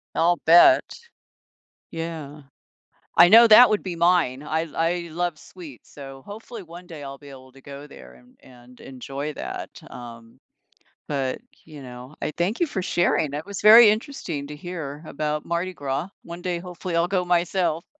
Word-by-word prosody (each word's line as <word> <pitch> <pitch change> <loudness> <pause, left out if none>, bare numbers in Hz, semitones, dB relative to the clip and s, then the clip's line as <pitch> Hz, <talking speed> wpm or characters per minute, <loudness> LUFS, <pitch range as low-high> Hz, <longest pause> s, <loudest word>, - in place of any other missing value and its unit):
I'll 175 +1 +2
bet. 175 - +7 1.1
Yeah. 160 -3 -7 0.8
I 175 +1 +8
know 230 +3 +8
that 230 +2 +8
would 215 - 0
be 180 -3 -6
mine, 165 -6 +1
I 160 +2 -2
I 170 +1 -1
love 175 -1 -3
sweets, 160 -9 -14
so 135 -2 -11
hopefully 215 +1 -10
one 175 +1 -13
day 160 -5 -10
I'll 140 0 -8
be 145 -1 -14
able 130 -1 -14
to 135 - -18
go 140 +1 -10
there 60 - -14
and 60 - -22
and 125 0 -18
enjoy 135 +3 -7
that, - - -7 0.2
um, 115 -1 -12 0.7
but, 135 0 -3 0.2
you 150 -3 -12
know, 125 +2 -11
I - - -2
thank 185 - -2
you 345 - +2
for 190 - -4
sharing, 175 -4 0
that 150 +2 -5
was 200 -2 -7
very 215 +1 +8
interesting 210 - -4
to 150 - -9
hear 155 -3 -7
about 150 0 -3
Mardi 170 +2 -3
Gras. 140 +3 -4 0.2
One 170 +1 -9
day, 180 -2 -2
hopefully, 180 0 -7
I'll 170 +1 +1
go 185 -2 -1
myself. 175 -1 0
165 Hz, 170 wpm, -23 LUFS, 140-180 Hz, 1.1 s, I